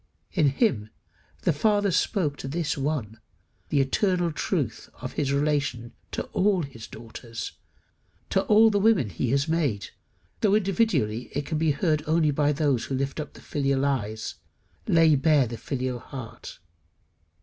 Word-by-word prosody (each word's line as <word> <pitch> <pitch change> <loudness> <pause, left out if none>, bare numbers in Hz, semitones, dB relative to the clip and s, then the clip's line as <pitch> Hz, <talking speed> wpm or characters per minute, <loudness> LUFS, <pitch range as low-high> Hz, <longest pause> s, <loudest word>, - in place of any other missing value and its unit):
In 155 -7 +3
him 135 - +1 0.5
the 170 - +3
Father 205 +5 +2
spoke 165 -4 +1
to - - -6
this 155 +2 -1
one 135 -7 -2 0.5
the 145 - +2
eternal 175 +5 +1
truth 150 - -2
of 125 +1 -6
his 140 -2 0
relation 140 -5 0 0.2
to - - -2
all 190 -3 +2
his 115 -6 -9
daughters, 115 0 -8 0.8
to 190 - +3
all 220 +1 +6
the 205 - +2
women 195 - +3
he 120 - -2
has 140 +4 +1
made, 145 -11 0 0.5
though 205 -2 +3
individually 190 - +1
it 145 +1 -2
can 155 +1 -2
be 160 0 +2
heard 155 +1 +1
only 155 -1 +3
by 145 +1 +2
those 140 -5 +1
who 135 - -3
lift 140 +3 -2
up 150 - -5
the - - -14
filial 140 -1 0
eyes, 110 -6 -2 0.5
lay 165 -2 +5
bare 145 -1 +4
the 115 0 -5
filial 130 0 -3
heart. 130 -2 -9
145 Hz, 155 wpm, -26 LUFS, 130-170 Hz, 0.8 s, all